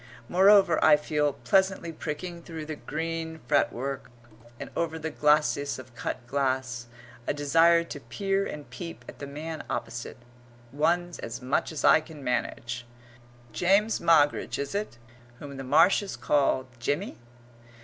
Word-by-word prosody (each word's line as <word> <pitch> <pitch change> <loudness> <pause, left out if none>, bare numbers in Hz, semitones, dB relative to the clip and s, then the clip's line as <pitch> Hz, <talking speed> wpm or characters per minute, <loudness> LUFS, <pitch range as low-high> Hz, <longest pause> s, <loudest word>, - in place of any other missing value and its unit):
Moreover, 195 +1 +5
I 150 - +7
feel, 150 -1 0
pleasantly 190 +1 +1
pricking 170 +2 -5
through 165 -2 -7
the 155 0 -5
green 160 +1 -4
fretwork 135 +3 0 0.5
and - - -7
over 160 -1 -1
the 160 0 -4
glacis 150 -1 +2
of 130 -1 -11
cut 120 +1 -5
glass, 130 -2 -1 0.4
a - - 0
desire 165 +4 +4
to 150 - -8
peer 195 - -1
and 150 -1 -7
peep 170 -2 -8
at - - -11
the 140 - -6
man 155 +3 -6
opposite 120 0 -4 0.5
one's 170 +4 0
as 115 +1 -6
much 130 +5 -1
as 155 - -3
I 160 - +7
can 155 -2 -12
manage. 120 -1 -2 0.7
James 200 +5 +3
Moggridge 150 -3 +3
is 140 +4 -4
it, 200 - -3 0.4
whom 140 +1 -9
the 135 - -5
Marshes 190 +8 +3
call 130 +2 +1
Jimmy? 145 - -2
150 Hz, 140 wpm, -27 LUFS, 135-170 Hz, 0.7 s, I